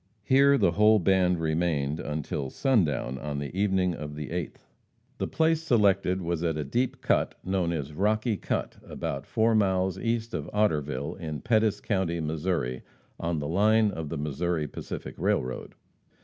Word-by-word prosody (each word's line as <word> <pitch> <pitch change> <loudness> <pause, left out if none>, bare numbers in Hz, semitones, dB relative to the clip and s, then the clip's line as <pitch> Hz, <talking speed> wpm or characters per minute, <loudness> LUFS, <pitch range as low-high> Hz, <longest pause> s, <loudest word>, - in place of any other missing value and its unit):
Here 140 +3 +5
the 85 - +3
whole 105 +4 +5
band 90 -2 +2
remained 80 -2 0
until 75 -2 -3
sundown 75 - +1
on 75 0 -4
the 70 +4 -5
evening 95 -2 +1
of 75 -2 -6
the 75 -3 -6
8th. 85 -2 -5 0.5
The - - -1
place 160 0 +2
selected 100 - +2
was 85 0 -2
at 80 -2 0
a 75 - -1
deep 120 - -1
cut - - +1
known 95 -3 0
as 75 -3 -3
Rocky 105 +6 +1
Cut, - - -3
about 70 - -5
four 115 0 +2
miles 95 -3 +1
east 115 +1 -1
of - - -4
Otterville, 75 -9 0
in 80 -4 -5
Pettis 110 -3 +2
county, 95 -5 -1
Missouri, 80 -5 -2 0.4
on 85 0 -1
the 75 -1 -3
line 105 +5 +3
of 80 -5 -5
the 80 - -3
Missouri 75 +2 -1
Pacific - - -7
railroad. 65 +1 -1
90 Hz, 160 wpm, -27 LUFS, 75-105 Hz, 0.5 s, Here